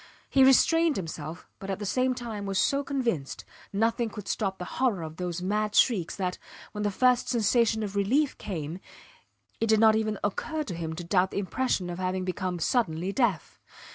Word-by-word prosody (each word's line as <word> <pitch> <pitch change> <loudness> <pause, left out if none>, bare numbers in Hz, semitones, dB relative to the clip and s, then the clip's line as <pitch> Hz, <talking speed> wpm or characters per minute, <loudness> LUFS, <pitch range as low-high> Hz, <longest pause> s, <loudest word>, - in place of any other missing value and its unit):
He 270 - +6
restrained 325 +4 +5
himself, 160 -2 -6
but 195 - -7
at 195 - -1
the 205 - -5
same 255 +5 +1
time 220 -5 -5
was 195 -1 -1
so 280 +7 +2
convinced 240 - -2 0.3
nothing 225 +3 +1
could 210 -2 -9
stop 195 -3 -1
the 180 - -6 0.2
horror 220 -10 +2
of 160 0 -8
those 180 -1 -3
mad 210 +2 -1
shrieks 200 -10 +3
that, 180 -2 -3 0.3
when 210 - -5
the 205 - +1
first 250 +4 +2
sensation 230 -1 +2
of 205 -1 -5
relief 260 +9 +2
came, 165 -3 -5 0.8
it 225 - +1
did 220 -1 +4
not 220 -1 +6
even 215 -1 0
occur 305 +10 -2
to 205 - -6
him 165 -1 -4
to 175 - -6
doubt 185 +1 +2
the - - -6
impression 200 -1 -1
of 175 0 -5
having 185 0 -1
become 185 -1 -2
suddenly 175 -2 0
deaf. 200 - 0
205 Hz, 190 wpm, -28 LUFS, 180-235 Hz, 0.8 s, He